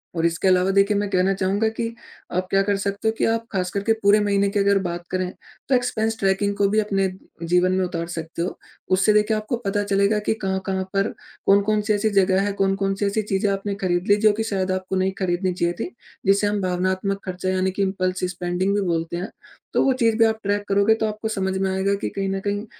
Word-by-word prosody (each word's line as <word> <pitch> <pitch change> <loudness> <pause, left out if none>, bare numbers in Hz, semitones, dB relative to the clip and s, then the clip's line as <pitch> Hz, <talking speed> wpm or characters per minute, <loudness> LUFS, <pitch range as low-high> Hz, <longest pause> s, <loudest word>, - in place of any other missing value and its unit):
और 165 0 0
इसके 170 +3 +1
अलावा 185 0 +4
देखिए 200 +1 +4
मैं 205 0 -1
कहना 190 0 +2
चाहूँगा 195 +3 0
कि 225 +1 -4 0.5
आप 185 0 0
क्या 195 - +4
कर 200 0 0
सकते 200 +2 -2
हो - - +4
कि - - +1
आप 225 0 0
खास 185 -2 -1
करके 200 +4 +1
पूरे 200 +1 +6
महीने 200 -1 +2
की 205 +1 -1
अगर 200 0 +3
बात 175 0 -5
करें, 185 -1 -1 0.4
तो 265 - +4
एक्सपेंस 225 -3 0
ट्रैकिंग 200 +1 +1
को 200 -1 +3
भी 215 +2 +2
अपने 195 -2 +1 0.4
जीवन 180 +2 +3
में 185 0 +1
उतार 170 -1 -4
सकते 165 -1 -5
हो। 175 - -3 0.4
उससे 195 +3 +3
देखिए 210 +1 +3
आपको 215 +3 -2
पता 205 +1 0
चलेगा 200 +1 +2
कि 210 - 0
कहाँ-कहाँ 190 0 -1
पर 200 +2 +1 0.4
कौन-कौन 205 +2 +3
सी 210 +1 0
ऐसी 210 +1 +1
जगह 195 -2 +3
है, 205 +1 0
कौन-कौन 195 0 0
सी 205 - -1
ऐसी 200 +2 0
चीज़ें 200 -1 0
आपने 195 +1 -2
खरीद 175 0 0
ली, 205 - +7
जो 215 0 +4
कि 220 +2 -2
शायद 190 -4 -1
आपको 185 0 -2
नहीं 190 0 +1
खरीदनी 185 0 0
चाहिए 175 -1 0
थी। - - -3 0.4
जिसे 200 +1 +4
हम 205 0 -1
भावनात्मक 185 +2 -1
खर्चा 185 0 -3
यानी 185 0 +1
कि 190 - -3
इम्पल्स 185 -1 -1
स्पेंडिंग 180 +3 -1
भी 205 - +1
बोलते 165 0 -1
हैं, 185 +5 -4 0.4
तो - - +3
वो 270 - +3
चीज़ 225 -1 +3
भी 225 - +5
आप 220 0 0
ट्रैक 205 0 0
करोगे 200 +2 +4
तो - - +3
आपको 215 +1 -4
समझ 190 -3 -1
में 190 0 0
आएगा 190 +1 +1
कि 200 - -3
कहीं 195 -1 -3
न 195 0 -1
कहीं 205 +1 -1
195 Hz, 235 wpm, -23 LUFS, 185-205 Hz, 0.5 s, ली